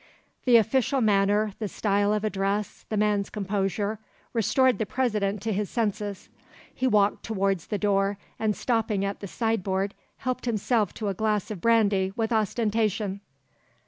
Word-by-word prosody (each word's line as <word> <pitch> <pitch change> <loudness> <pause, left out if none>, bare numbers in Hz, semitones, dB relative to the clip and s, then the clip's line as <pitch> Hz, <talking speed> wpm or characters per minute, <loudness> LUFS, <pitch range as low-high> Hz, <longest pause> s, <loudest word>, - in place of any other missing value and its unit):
The 245 -2 +7
official 260 +4 +2
manner, 205 -1 +3
the 215 - -2
style 205 0 +1
of 210 0 0
address, 200 0 -2
the 215 - -1
man's 205 -1 +1
composure, 205 +1 -2 0.3
restored 255 +3 +3
the 220 - 0
President 210 -5 -1
to 220 -1 0
his 205 0 -1
senses. 205 -3 -2 0.5
He 260 - 0
walked 210 -4 +3
towards 195 -5 -1
the 210 - -1
door 200 -1 +1 0.2
and 215 -2 +1
stopping 220 -5 0
at 200 0 -3
the 200 - -6
sideboard 200 -2 -1 0.2
helped 255 0 -3
himself 220 -2 +1
to 210 -3 -2
a - - -1
glass 210 +1 -1
of 195 -5 -6
brandy 205 -5 +3
with 225 0 -1
ostentation. 215 -2 0
210 Hz, 150 wpm, -26 LUFS, 200-225 Hz, 0.5 s, The